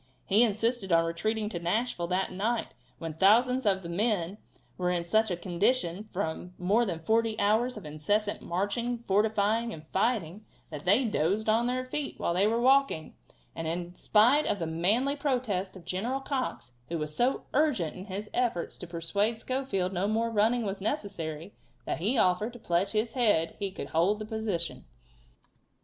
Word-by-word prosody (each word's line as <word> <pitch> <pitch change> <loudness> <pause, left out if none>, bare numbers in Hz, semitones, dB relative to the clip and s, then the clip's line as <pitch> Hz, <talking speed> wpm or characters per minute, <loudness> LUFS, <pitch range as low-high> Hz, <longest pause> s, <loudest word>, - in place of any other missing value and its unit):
He 205 +3 +4
insisted 225 -2 +1
on 165 0 +4
retreating 210 +6 -1
to 175 - -4
Nashville 175 0 -1
that 185 +2 0
night 220 +5 -1 0.2
when 165 -1 -5
thousands 235 +8 +4
of 190 -1 +2
the - - -6
men 195 +1 0 0.4
were 180 -1 -1
in 175 -1 0
such 220 +5 +2
a 180 - -2
condition 190 +2 0
from 180 0 -4
more 205 +7 +2
than 165 -3 -3
forty 225 +2 +1
hours' 220 +4 +2
of 210 - -9
incessant 205 +8 -1
marching, 230 +7 -2
fortifying 215 +3 +2
and 155 -6 -9
fighting 205 -3 0 0.3
that 150 -1 -7
they 210 +8 +5
dozed 205 +1 0
on 225 +2 +3
their 255 +1 -1
feet 280 +2 -4
while 170 - 0
they 190 +4 +3
were 230 +2 +1
walking, 265 - +3 0.4
and 165 -1 -4
in 175 +2 -3
spite 235 +10 +4
of - - +1
the 170 - -3
manly 205 - +1
protest 245 -10 -1
of 185 - -12
General 235 +9 -2
Cox, 265 - -3 0.2
who 170 - -2
was 150 -1 -4
so 250 +3 +1
urgent 260 - +1
in 185 - -8
his 205 +1 -5
efforts 235 -9 -1
to 180 - -7
persuade 200 +7 -1
Schofield 220 -8 -2
no 190 +2 0
more 225 +2 0
running 225 +3 +2
was 195 -1 -3
necessary, 190 - -4 0.3
that - - -2
he 215 +10 +1
offered 200 +4 +2
to 245 - -11
pledge 175 -1 0
his 220 +2 0
head 205 -10 +2
he 200 -1 -1
could 190 - -7
hold 175 +6 +2
the 215 - -6
position. 215 -6 -3
205 Hz, 175 wpm, -29 LUFS, 175-230 Hz, 0.4 s, they